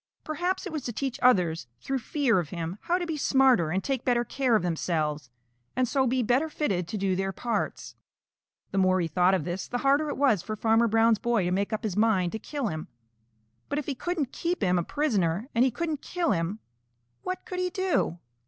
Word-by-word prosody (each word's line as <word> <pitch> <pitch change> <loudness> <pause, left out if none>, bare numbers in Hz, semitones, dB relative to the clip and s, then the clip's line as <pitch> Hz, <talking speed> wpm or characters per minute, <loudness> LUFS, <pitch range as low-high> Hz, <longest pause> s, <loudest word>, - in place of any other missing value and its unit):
Perhaps 355 +5 -2
it - - -5
was 305 - -2
to 240 - -2
teach 260 +2 -3
others 180 - +3
through 270 0 -2
fear 260 - +1
of 165 -4 -4
him 170 +3 -5
how 345 +1 +1
to 360 - -2
be 325 -2 -3
smarter 265 - +4
and 185 +4 -1
take 270 -3 -2
better 240 -1 +2
care 260 -3 +1
of 215 - +2
themselves 155 -5 -1 0.5
and 255 0 +2
so 265 +1 +1
be 250 +1 +1
better 260 +8 +2
fitted 190 - -1
to 210 - -4
do 190 -2 0
their 195 +1 -1
parts. 225 +1 -3 0.8
The 195 - 0
more 185 0 +3
he 170 - 0
thought 180 +4 +3
of 180 - -1
this, 175 +3 -4
the 245 - -2
harder 285 +2 +3
it - - -3
was 260 -10 +3
for 215 - -5
Farmer 225 +2 +3
Brown's 225 0 +3
boy 235 -4 +1
to 175 - 0
make 200 +3 0
up 215 +2 -2
his 210 -5 -2
mind 205 -5 +2
to 220 - -4
kill 285 +4 -4
him. 155 -7 -3 0.8
But 285 - -1
if 295 - -2
he 285 - -2
couldn't 295 -1 -2
keep 345 -6 -2
him 180 -2 +3
a - - -1
prisoner 210 - 0
and 230 - +4
he 260 - +4
couldn't 305 +4 -3
kill 350 -3 -1
him, 170 +5 -1 0.6
what 370 - -4
could 365 - -5
he 365 0 0
do? 375 - 0
230 Hz, 220 wpm, -27 LUFS, 185-280 Hz, 0.8 s, smarter